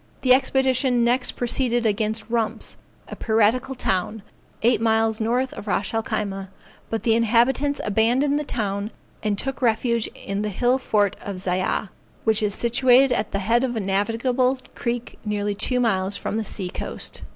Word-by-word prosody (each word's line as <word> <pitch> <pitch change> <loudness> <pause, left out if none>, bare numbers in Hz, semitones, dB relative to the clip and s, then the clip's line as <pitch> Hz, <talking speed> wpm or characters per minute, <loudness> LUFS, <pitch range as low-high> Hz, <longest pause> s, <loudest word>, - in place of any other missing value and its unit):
The 255 -1 +5
expedition 260 -2 +2
next 245 +2 +2
proceeded 240 -1 0
against 215 +1 0
Rumps, 230 -1 -1 0.3
a - - -7
piratical 225 +4 +1
town, 195 -1 -1 0.4
eight 235 0 +3
miles 225 -1 +2
north 245 +4 0
of 210 - -9
Ras 200 0 -1
el 225 - +1
Khyma, 195 -3 -3 0.4
but 225 - -3
the 225 - +3
inhabitants 240 +5 +2
abandoned 245 +8 +2
the - - -2
town 205 -6 -2 0.3
and 210 -2 -1
took 270 +4 -3
refuge 235 -1 +1
in 195 +1 -4
the 210 - -2
hill 245 +6 +1
fort 205 -6 +1
of 200 - -5
Zyah, 185 +2 -1 0.3
which 220 0 +2
is 205 -2 +2
situated 250 +2 +4
at 220 -3 -1
the - - -1
head 230 +5 +2
of 250 -2 -1
a - - -1
navigable 230 +6 +1 0.2
creek 240 0 -4
nearly 205 -1 -1
two 250 +5 0
miles 195 -4 +1
from - - -4
the 225 - -1
sea 190 -3 -4
coast. - - -4
225 Hz, 165 wpm, -23 LUFS, 210-250 Hz, 0.4 s, The